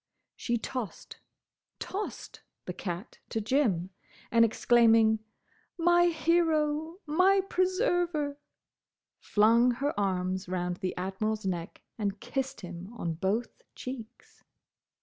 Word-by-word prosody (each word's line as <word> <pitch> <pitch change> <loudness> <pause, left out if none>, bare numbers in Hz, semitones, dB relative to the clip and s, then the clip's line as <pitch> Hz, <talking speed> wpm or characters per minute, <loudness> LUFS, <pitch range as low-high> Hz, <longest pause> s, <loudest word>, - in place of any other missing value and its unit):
She 235 -1 -1
tossed—tossed!—the 245 - -8
cat 180 +3 -6
to 225 - -1
Jim, 210 - +1 0.4
and, 230 -1 +6
exclaiming, 225 -1 +4 0.6
"My 345 +1 +5
hero! 320 -1 +1
My 365 +6 +4
preserver!" 355 -7 +1 0.8
flung 230 +4 +4
her 280 +4 -1
arms 185 -1 -1
round 180 -1 -2
the 185 -2 -3
Admiral's 200 +3 -2
neck 175 -3 -4 0.2
and 200 -1 -2
kissed 265 +3 -3
him 180 +2 -8
on 170 -5 -2
both 195 +8 -2
cheeks. 250 -4 -9
230 Hz, 95 wpm, -29 LUFS, 190-300 Hz, 0.8 s, and